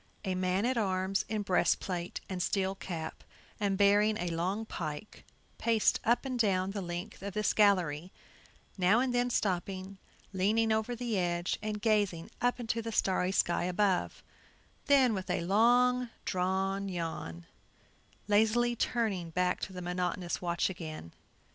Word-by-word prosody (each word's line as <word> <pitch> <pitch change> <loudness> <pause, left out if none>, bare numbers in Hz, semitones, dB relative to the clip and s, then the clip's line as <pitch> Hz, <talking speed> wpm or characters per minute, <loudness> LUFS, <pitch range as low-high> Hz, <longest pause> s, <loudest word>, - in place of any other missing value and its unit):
A 190 - 0
man 185 +3 0
at 250 -1 +1
arms 190 -1 0
in 215 -1 -1
breast 185 -2 +2
plate 175 -2 -4
and 185 -2 -4
steel 190 0 0
cap, 165 -4 -6 0.4
and 200 -2 0
bearing 205 +2 +4
a 175 -3 -2
long 185 +6 -1
pike, 155 0 -6 0.4
paced 225 -2 +2
up 235 +4 +2
and 255 -2 -3
down 190 -3 +2
the 200 0 -4
length 175 +4 -6
of 200 -1 -6
this 210 0 +1
gallery, 180 -5 +2 0.7
now 190 +5 +4
and 255 0 0
then 245 0 +1
stopping, 190 -2 -2 0.3
leaning 215 +4 +2
over 220 +2 0
the 235 -4 -1
edge, 175 0 -1
and 210 -1 -4
gazing 205 -7 +1
up 245 +1 +1
into 230 -1 -2
the 225 0 -5
starry 185 -3 +1
sky 175 -2 +1
above; 185 +1 0 0.6
then, 265 -4 +5
with 190 -2 -4
a 180 - 0
long 245 +6 +3 0.2
drawn 190 +2 -1
yawn, 160 - -5 0.8
lazily 220 +3 +3
turning 215 -8 -1
back 180 +2 0
to - - -5
the 180 -1 -7
monotonous 180 0 -2
watch 175 -1 0
again. 160 - -7
195 Hz, 150 wpm, -31 LUFS, 180-220 Hz, 0.8 s, then